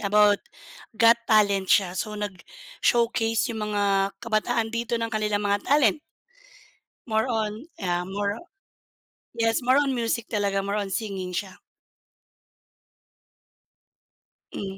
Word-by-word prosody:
about 205 Hz, 0 st, +4 dB, 0.6 s
Got 230 Hz, +2 st, +6 dB
Talent 200 Hz, -3 st, +3 dB
siya. 185 Hz, -3 st, +3 dB
So, 215 Hz, -, -3 dB
nag-showcase 225 Hz, -, -1 dB
yung 220 Hz, -2 st, -3 dB
mga 200 Hz, -1 st, +1 dB
kabataan 230 Hz, 0 st, 0 dB
dito 235 Hz, 0 st, -2 dB
ng 230 Hz, -, -1 dB
kanilang 210 Hz, -1 st, 0 dB
mga 200 Hz, 0 st, +1 dB
talent. 280 Hz, -4 st, +4 dB, 1.1 s
More 220 Hz, +1 st, +2 dB
on 220 Hz, +1 st, -2 dB
yeah, 175 Hz, -1 st, -1 dB
more 200 Hz, +2 st, -2 dB, 1.0 s
yes, 225 Hz, +1 st, +1 dB
more 255 Hz, +3 st, +4 dB
on 275 Hz, -2 st, 0 dB
music 235 Hz, -1 st, -1 dB
talaga, 200 Hz, -2 st, 0 dB
more 200 Hz, +1 st, -2 dB
on 200 Hz, -1 st, -4 dB
singing 190 Hz, -3 st, -3 dB
siya. 190 Hz, 0 st, -5 dB, 2.9 s
Mm, 195 Hz, -1 st, -5 dB
210 Hz, 115 wpm, -25 LUFS, 200-230 Hz, 2.9 s, Got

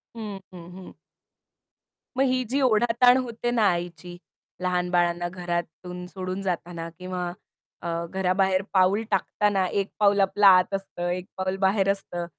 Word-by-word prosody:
हं, 210 Hz, -3 st, -6 dB
हं, 175 Hz, 0 st, -11 dB
हं. 185 Hz, -, -10 dB, 1.3 s
मग 270 Hz, -, +4 dB
ही 255 Hz, 0 st, +1 dB
जी 280 Hz, +1 st, +1 dB
ओढाताण 240 Hz, +1 st, +4 dB
होते 240 Hz, -1 st, -2 dB
ना 230 Hz, -3 st, +2 dB
आईची, 175 Hz, 0 st, -5 dB, 0.4 s
लहान 180 Hz, -1 st, 0 dB
बाळांना 175 Hz, 0 st, +1 dB
घरातून 180 Hz, 0 st, -5 dB
सोडून 185 Hz, +1 st, -5 dB
जाताना 170 Hz, -2 st, -4 dB
किंवा 180 Hz, -1 st, -4 dB, 0.5 s
अ, 170 Hz, -, -5 dB, 0.2 s
घराबाहेर 190 Hz, 0 st, +1 dB
पाऊल 190 Hz, +3 st, +3 dB
टाकताना 195 Hz, 0 st, +1 dB
एक 200 Hz, +1 st, -1 dB
पाऊल 200 Hz, -1 st, +4 dB
आपला 200 Hz, +1 st, +4 dB
आत 185 Hz, +1 st, +6 dB
असतं, 175 Hz, -3 st, -3 dB
एक 180 Hz, +1 st, -3 dB
पाऊल 190 Hz, 0 st, -2 dB
बाहेर 195 Hz, 0 st, +2 dB
असतं 175 Hz, -3 st, -5 dB
185 Hz, 140 wpm, -25 LUFS, 180-205 Hz, 1.3 s, आत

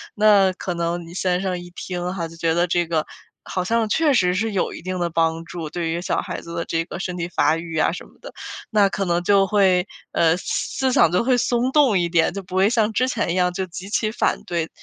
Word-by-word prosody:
那 205 Hz, -3 st, +5 dB
可 185 Hz, -1 st, -4 dB
能 170 Hz, 0 st, -2 dB
你 170 Hz, -, -11 dB
先 180 Hz, 0 st, 0 dB
生 185 Hz, -2 st, -2 dB
一 175 Hz, 0 st, -10 dB
听 180 Hz, 0 st, -4 dB
哈， 170 Hz, -3 st, -3 dB
就 165 Hz, -, -13 dB
觉 165 Hz, 0 st, 0 dB
得 175 Hz, +2 st, +2 dB
这 175 Hz, 0 st, +1 dB
个 160 Hz, -2 st, -1 dB, 0.4 s
好 185 Hz, -, -3 dB
像 225 Hz, +3 st, +1 dB
确 310 Hz, +5 st, +3 dB
实 180 Hz, -7 st, +3 dB
是 220 Hz, +4 st, 0 dB
有 195 Hz, -3 st, -1 dB
一 -, -, -9 dB
定 185 Hz, +1 st, -4 dB
的 175 Hz, -1 st, 0 dB
帮 165 Hz, 0 st, 0 dB
助， 165 Hz, -2 st, -6 dB
对 170 Hz, 0 st, -3 dB
于 170 Hz, +1 st, -2 dB
小 -, -, -1 dB
孩 -, -, -6 dB
子 170 Hz, -, -9 dB
的 170 Hz, -, -2 dB
这 165 Hz, 0 st, -1 dB
个 175 Hz, -, -7 dB
身 180 Hz, -2 st, -4 dB
体 170 Hz, -1 st, -2 dB
发 160 Hz, -, +2 dB
育 165 Hz, -1 st, -6 dB
啊 155 Hz, -, +3 dB
什 -, -, -7 dB
么 -, -, -19 dB
的。 -, -, -10 dB, 0.4 s
那 205 Hz, -3 st, +4 dB
可 195 Hz, 0 st, -2 dB
能 175 Hz, -1 st, 0 dB
就 195 Hz, +1 st, +4 dB
会， 190 Hz, -2 st, +3 dB, 0.2 s
呃， 165 Hz, -1 st, +3 dB
思 -, -, -3 dB
思 -, -, 0 dB
想 170 Hz, -, +5 dB
就 180 Hz, +5 st, +2 dB
会 250 Hz, 0 st, +3 dB
松 245 Hz, +2 st, +1 dB
动 265 Hz, -8 st, +4 dB
一 175 Hz, -1 st, 0 dB
点， 170 Hz, 0 st, +2 dB
就 200 Hz, 0 st, -5 dB
不 180 Hz, 0 st, -8 dB
会 190 Hz, +2 st, +4 dB
像 225 Hz, -2 st, +1 dB
之 255 Hz, +4 st, +2 dB
前 260 Hz, -, -1 dB
一 -, -, -1 dB
样， 180 Hz, -1 st, +2 dB
就 190 Hz, +1 st, -2 dB
极 185 Hz, +2 st, -9 dB
其 215 Hz, +1 st, 0 dB
反 -, -, 0 dB
对。 170 Hz, -2 st, -2 dB
180 Hz, 280 characters per minute, -22 LUFS, 170-200 Hz, 0.4 s, 那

